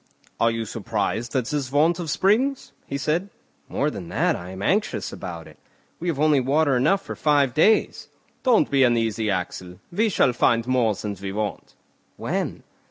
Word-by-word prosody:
"Are 115 Hz, -, +4 dB
you 115 Hz, 0 st, -2 dB
surprised 110 Hz, +3 st, -3 dB
at 130 Hz, -3 st, +1 dB
this 140 Hz, -1 st, -3 dB
want 160 Hz, +5 st, +3 dB
of 170 Hz, -3 st, -4 dB
springs?" 240 Hz, -, +1 dB, 0.2 s
he 140 Hz, -, -3 dB
said. 160 Hz, +7 st, -1 dB, 0.4 s
"More 150 Hz, +2 st, 0 dB
than 90 Hz, -, -7 dB
that, -, -, +1 dB
I 90 Hz, +1 st, -8 dB
am 95 Hz, +1 st, -7 dB
anxious -, -, 0 dB
about 85 Hz, -3 st, -7 dB
it; -, -, -17 dB, 0.4 s
we 175 Hz, -, -4 dB
have 160 Hz, -5 st, -1 dB
only 150 Hz, -2 st, +4 dB
water 140 Hz, +2 st, +2 dB
enough 190 Hz, +11 st, +2 dB
for -, -, -6 dB
five 145 Hz, -4 st, +2 dB
days." 215 Hz, -, +2 dB, 0.3 s
"Don't 250 Hz, -4 st, +3 dB
be 140 Hz, -1 st, +3 dB
uneasy, 115 Hz, -3 st, +2 dB
Axel, 90 Hz, -1 st, -4 dB
we 215 Hz, +6 st, +1 dB
shall 135 Hz, -9 st, +2 dB
find 115 Hz, -1 st, +2 dB
more 125 Hz, -4 st, +2 dB
than 105 Hz, +1 st, -5 dB
we 95 Hz, -1 st, -4 dB
want." 105 Hz, +1 st, -4 dB, 0.4 s
"When?" -, -, -3 dB
130 Hz, 175 wpm, -24 LUFS, 110-155 Hz, 0.4 s, Are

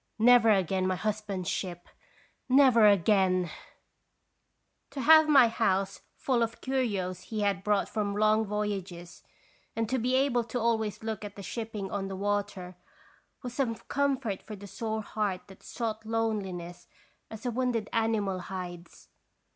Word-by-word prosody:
Never 235 Hz, 0 st, +6 dB
again 190 Hz, -2 st, +2 dB
my 185 Hz, -, 0 dB
husband's 205 Hz, -3 st, -3 dB
ship, 175 Hz, -2 st, -4 dB, 0.6 s
never 255 Hz, -5 st, +6 dB
again! 185 Hz, -3 st, +3 dB, 1.4 s
To 275 Hz, -1 st, -5 dB
have 315 Hz, +3 st, +7 dB
my 270 Hz, -5 st, +7 dB
house 195 Hz, -4 st, 0 dB
full 250 Hz, -3 st, 0 dB
of 230 Hz, 0 st, -1 dB
curios 200 Hz, -9 st, -2 dB
he 215 Hz, -2 st, -4 dB
had 200 Hz, -2 st, 0 dB
brought 205 Hz, -1 st, +1 dB
from 205 Hz, -2 st, -2 dB
long 215 Hz, +1 st, +3 dB
voyages, 195 Hz, -4 st, -4 dB, 0.5 s
and 225 Hz, -1 st, -1 dB
to 260 Hz, -, 0 dB
be 250 Hz, +3 st, +1 dB
able 260 Hz, -3 st, +2 dB
to 240 Hz, +2 st, -3 dB
always 220 Hz, -3 st, -1 dB
look 220 Hz, -2 st, -4 dB
at 205 Hz, -1 st, -8 dB
the 200 Hz, -, -9 dB
shipping 215 Hz, -3 st, -5 dB
on 195 Hz, -1 st, -2 dB
the 195 Hz, -, -5 dB
water, 200 Hz, -2 st, -3 dB, 0.7 s
was 245 Hz, -1 st, -5 dB
some 245 Hz, -3 st, -1 dB
comfort 265 Hz, -7 st, -1 dB
for 215 Hz, -, -9 dB
the 200 Hz, 0 st, -11 dB
sore 220 Hz, +2 st, -4 dB
heart 200 Hz, -4 st, -2 dB
that 190 Hz, -, -15 dB
sought 225 Hz, -2 st, -4 dB
loneliness 205 Hz, -6 st, -3 dB, 0.4 s
as' 220 Hz, +3 st, -10 dB
a 245 Hz, -, 0 dB
wounded 240 Hz, -3 st, -1 dB
animal 220 Hz, -4 st, 0 dB
hides. 175 Hz, -2 st, -8 dB
210 Hz, 145 wpm, -29 LUFS, 195-230 Hz, 1.4 s, have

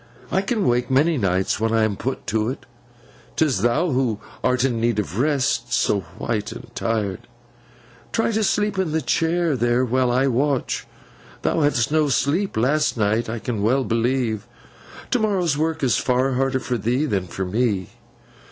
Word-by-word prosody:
I 190 Hz, -, +2 dB
can 210 Hz, -, 0 dB
wake 125 Hz, 0 st, +1 dB
many 145 Hz, +3 st, +3 dB
nights, 95 Hz, -2 st, 0 dB
when 110 Hz, 0 st, 0 dB
I 115 Hz, -1 st, +3 dB
am 110 Hz, -2 st, +1 dB
put 130 Hz, +6 st, -4 dB
to 110 Hz, +3 st, 0 dB
it. 130 Hz, -, -6 dB, 0.7 s
'Tis 140 Hz, -11 st, +1 dB
thou 150 Hz, -, +2 dB
who 125 Hz, -5 st, 0 dB, 0.2 s
art 125 Hz, 0 st, +2 dB
in 120 Hz, -4 st, 0 dB
need 115 Hz, -2 st, +1 dB
of 105 Hz, 0 st, -2 dB
rest—so 130 Hz, -6 st, +1 dB, 0.2 s
white 105 Hz, -3 st, -2 dB
and -, -, -10 dB
tired. 105 Hz, -5 st, -2 dB, 0.8 s
Try 225 Hz, 0 st, +1 dB
to 220 Hz, 0 st, 0 dB
sleep 210 Hz, -1 st, +1 dB
in 175 Hz, -5 st, 0 dB
the 160 Hz, -, +1 dB
chair 165 Hz, +2 st, +1 dB
there, 120 Hz, +1 st, +2 dB
while 125 Hz, +1 st, +1 dB
I 130 Hz, +2 st, +2 dB
watch. 135 Hz, +1 st, 0 dB, 0.6 s
Thou -, -, +1 dB
hadst 145 Hz, -4 st, +2 dB
no 155 Hz, -1 st, +2 dB
sleep 145 Hz, -, 0 dB
last 135 Hz, +4 st, +1 dB
night, 110 Hz, +2 st, +1 dB
I 115 Hz, -, -3 dB
can 110 Hz, -2 st, -3 dB
well 130 Hz, +6 st, +2 dB
believe. 115 Hz, -2 st, 0 dB, 0.6 s
To 250 Hz, -, +2 dB
morrow's 190 Hz, -8 st, +1 dB
work 160 Hz, 0 st, -1 dB
is 125 Hz, -4 st, +3 dB
far 130 Hz, +1 st, +1 dB
harder 130 Hz, +1 st, +1 dB
for 125 Hz, -2 st, -2 dB
thee 125 Hz, +8 st, +1 dB
than 100 Hz, -9 st, -1 dB
for 95 Hz, +2 st, -4 dB
me. 100 Hz, -2 st, -1 dB
125 Hz, 170 wpm, -22 LUFS, 115-150 Hz, 0.8 s, many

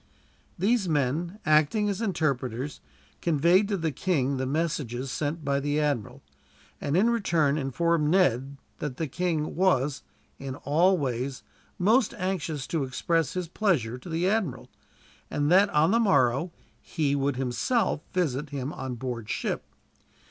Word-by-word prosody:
These 200 Hz, +1 st, +1 dB
men, 155 Hz, +6 st, 0 dB
acting 155 Hz, +8 st, +3 dB
as 200 Hz, +1 st, -2 dB
interpreters, 140 Hz, -, -2 dB, 0.4 s
conveyed 170 Hz, +5 st, +3 dB
to 200 Hz, -1 st, -1 dB
the 160 Hz, -3 st, -1 dB
king 140 Hz, -5 st, 0 dB
the 130 Hz, 0 st, -2 dB
messages 135 Hz, -4 st, -2 dB
sent 150 Hz, +2 st, -3 dB
by 140 Hz, 0 st, +1 dB
the 145 Hz, +2 st, 0 dB
admiral; 145 Hz, -8 st, -2 dB, 0.6 s
and 145 Hz, +4 st, 0 dB
in 225 Hz, +5 st, +4 dB
return 170 Hz, -11 st, +2 dB
informed 150 Hz, +3 st, +1 dB
Ned 140 Hz, -6 st, +2 dB, 0.2 s
that 145 Hz, -4 st, -4 dB
the 165 Hz, -, -1 dB
king 155 Hz, +1 st, -2 dB
was, 150 Hz, -6 st, +2 dB, 0.4 s
in 135 Hz, -1 st, -5 dB
all 170 Hz, +7 st, +3 dB
ways, 130 Hz, -2 st, -3 dB, 0.3 s
most 225 Hz, +5 st, +3 dB
anxious 180 Hz, -8 st, -2 dB
to 160 Hz, -4 st, -1 dB
express 155 Hz, +3 st, 0 dB
his 180 Hz, -2 st, -3 dB
pleasure 155 Hz, -, 0 dB
to 170 Hz, -, -11 dB
the 165 Hz, +2 st, 0 dB
admiral; 175 Hz, -, -1 dB, 0.6 s
and 145 Hz, +1 st, 0 dB
that, 195 Hz, +3 st, +6 dB
on 160 Hz, 0 st, +3 dB
the 230 Hz, -, +4 dB
morrow, 140 Hz, -, +2 dB, 0.3 s
he 145 Hz, -4 st, -1 dB
would 140 Hz, -1 st, 0 dB
himself 150 Hz, -, 0 dB
visit 150 Hz, -5 st, -1 dB
him 140 Hz, 0 st, -4 dB
on 130 Hz, -1 st, -5 dB
board 120 Hz, -3 st, -5 dB
ship. -, -, -2 dB
150 Hz, 145 wpm, -27 LUFS, 135-180 Hz, 0.6 s, that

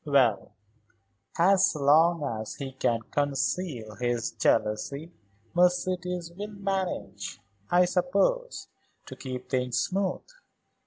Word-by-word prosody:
"Well, 130 Hz, -9 st, +2 dB, 0.8 s
as 190 Hz, +1 st, +4 dB
long 155 Hz, +3 st, +4 dB
as 110 Hz, -5 st, -4 dB
he 135 Hz, -2 st, -6 dB
can 120 Hz, -3 st, 0 dB
conceal 145 Hz, -4 st, -1 dB
his 120 Hz, -2 st, -1 dB
jealousy, 140 Hz, +10 st, 0 dB, 0.4 s
Mercedes 180 Hz, -1 st, +1 dB
will 200 Hz, +4 st, -6 dB
manage, 195 Hz, -2 st, -3 dB, 0.3 s
I 180 Hz, +1 st, +5 dB
suppose, 200 Hz, -, 0 dB, 0.4 s
to -, -, -9 dB
keep 130 Hz, -2 st, -6 dB
things 125 Hz, -2 st, -1 dB
smooth. 190 Hz, +3 st, 0 dB
165 Hz, 100 wpm, -28 LUFS, 130-180 Hz, 0.8 s, I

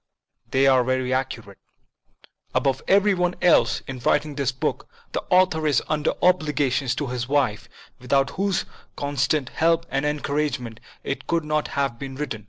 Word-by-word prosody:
They 135 Hz, +1 st, +3 dB
are 130 Hz, -2 st, +5 dB
very 130 Hz, 0 st, 0 dB
accurate. 115 Hz, -6 st, -4 dB, 1.0 s
Above 135 Hz, -1 st, +1 dB
every 200 Hz, +1 st, +4 dB
one 180 Hz, -1 st, 0 dB
else, 175 Hz, -, +3 dB
in 130 Hz, -1 st, -6 dB
writing 145 Hz, +4 st, +1 dB
this 140 Hz, -2 st, -1 dB
book, 130 Hz, -, -3 dB, 0.2 s
the -, -, -2 dB
author 180 Hz, -4 st, +3 dB
is 145 Hz, -4 st, +2 dB
under 155 Hz, -1 st, 0 dB
obligations 145 Hz, -7 st, +2 dB
to 145 Hz, -, -2 dB
his 125 Hz, -2 st, -3 dB
wife, 135 Hz, -8 st, 0 dB, 0.3 s
without 135 Hz, +2 st, +1 dB
whose 195 Hz, -1 st, -1 dB, 0.3 s
constant 140 Hz, 0 st, 0 dB
help 165 Hz, 0 st, +1 dB
and 135 Hz, +1 st, 0 dB
encouragement 140 Hz, -5 st, -2 dB, 0.2 s
it 140 Hz, -, -4 dB
could 165 Hz, -2 st, 0 dB
not 150 Hz, 0 st, 0 dB
have 135 Hz, -4 st, 0 dB
been 135 Hz, -1 st, -6 dB
written. 135 Hz, -6 st, -4 dB
140 Hz, 155 wpm, -23 LUFS, 130-155 Hz, 1.0 s, are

